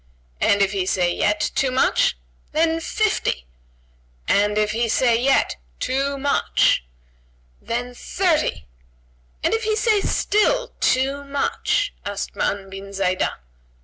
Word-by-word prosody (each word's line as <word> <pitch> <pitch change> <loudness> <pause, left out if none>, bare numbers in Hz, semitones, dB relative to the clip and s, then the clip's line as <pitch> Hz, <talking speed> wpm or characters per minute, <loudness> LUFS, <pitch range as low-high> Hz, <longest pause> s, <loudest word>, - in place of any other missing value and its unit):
"And 200 0 +3
if 195 - +1
he 190 -3 -1
say 175 -2 +1
yet, 210 0 0
too 270 - +1
much?" 255 - +2 0.4
"Then, 325 +1 +2
fifty!" 330 - -1 0.8
"And 205 +1 +2
if 210 0 +2
he 230 +1 0
say 235 +1 +3
yet, 270 - +2 0.2
too 275 +2 -1
much?" 280 - +2 0.8
"Then 245 +2 -3
thirty!" 310 - 0 0.8
"And - - +2
if 450 0 0
he 435 0 +1
say 430 -1 +2
still, 485 +6 +1
too 270 +2 +1
much?" 285 +8 -1
asked 200 0 -5
Ma'an 195 -1 -1
bin 195 +1 -8
Zaidah. 185 -1 0
255 Hz, 125 wpm, -22 LUFS, 200-320 Hz, 0.8 s, And